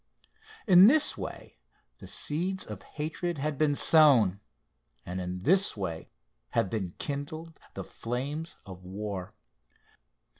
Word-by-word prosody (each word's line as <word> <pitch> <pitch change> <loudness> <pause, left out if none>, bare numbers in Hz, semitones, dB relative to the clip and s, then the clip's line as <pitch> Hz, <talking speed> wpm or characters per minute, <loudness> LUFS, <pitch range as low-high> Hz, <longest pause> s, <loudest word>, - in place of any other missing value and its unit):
In 185 -1 +8
this 305 +5 +4
way - - -9 0.4
the - - -11
seeds 185 +5 -1
of 105 -3 -8
hatred 160 - -4
had 150 +2 -2
been 150 -2 +2
sown, 130 - +5 0.7
and 90 +1 -5
in 90 0 -5
this 190 - +3
way 85 -5 -5 0.4
have 95 - 0
been 95 -6 -4
kindled 155 +3 -6 0.2
the - - -5
flames 140 +8 -5
of 95 -2 -11
war. 95 0 -6
140 Hz, 120 wpm, -28 LUFS, -, 0.7 s, In